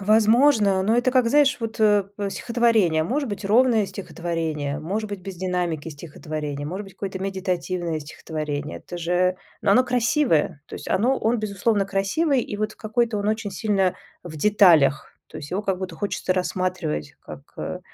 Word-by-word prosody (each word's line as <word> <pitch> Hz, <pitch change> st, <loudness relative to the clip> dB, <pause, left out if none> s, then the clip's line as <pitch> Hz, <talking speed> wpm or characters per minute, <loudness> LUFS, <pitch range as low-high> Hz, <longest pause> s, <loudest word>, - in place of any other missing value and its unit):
Возможно. 215 Hz, -1 st, +4 dB
Но 220 Hz, +4 st, +2 dB
это, 245 Hz, +1 st, +2 dB
как 255 Hz, -2 st, +3 dB
знаешь 285 Hz, +1 st, +4 dB
вот, 225 Hz, -1 st, -5 dB
э, 205 Hz, -2 st, +4 dB
в 200 Hz, -1 st, -3 dB
стихотворение. 225 Hz, -9 st, +2 dB
Может 270 Hz, -, -1 dB
быть 205 Hz, -1 st, -5 dB
ровное 225 Hz, 0 st, +4 dB
стихотворение, 165 Hz, -6 st, -3 dB
может 205 Hz, +8 st, -3 dB
быть 200 Hz, -2 st, -6 dB
без 190 Hz, -1 st, -8 dB
динамики 175 Hz, -4 st, -2 dB
стихотворение, 150 Hz, -1 st, -6 dB
может 190 Hz, +6 st, -5 dB
быть 195 Hz, -, -14 dB
какое-то 195 Hz, -1 st, -5 dB
медитативное 185 Hz, -3 st, -2 dB
стихотворение. 150 Hz, -1 st, -5 dB
Это 175 Hz, -, -8 dB
же 180 Hz, +2 st, +1 dB, 0.3 s
но 200 Hz, -, +2 dB
оно 255 Hz, +4 st, +5 dB
красивое. 245 Hz, -, +1 dB
То -, -, -9 dB
есть -, -, -7 dB
оно 250 Hz, +7 st, +2 dB
он, 230 Hz, +2 st, +1 dB
безусловно, 205 Hz, 0 st, 0 dB
красивый, 245 Hz, +10 st, +1 dB
и 205 Hz, -, -5 dB
вот 215 Hz, 0 st, -2 dB
какой-то 220 Hz, 0 st, -1 dB
он 205 Hz, -, -1 dB
очень 215 Hz, -1 st, -1 dB
сильно 195 Hz, -4 st, +1 dB, 0.3 s
в 165 Hz, -3 st, -9 dB
деталях. 165 Hz, -7 st, +4 dB, 0.2 s
То -, -, -10 dB
есть 145 Hz, -, -8 dB
его 200 Hz, +3 st, -1 dB
как 190 Hz, -2 st, -1 dB
будто 185 Hz, -3 st, -5 dB
хочется 195 Hz, 0 st, -2 dB
рассматривать, 185 Hz, -, -2 dB
как, -, -, -10 dB, 0.2 s
э, -, -, -4 dB
195 Hz, 170 wpm, -23 LUFS, 170-220 Hz, 0.3 s, оно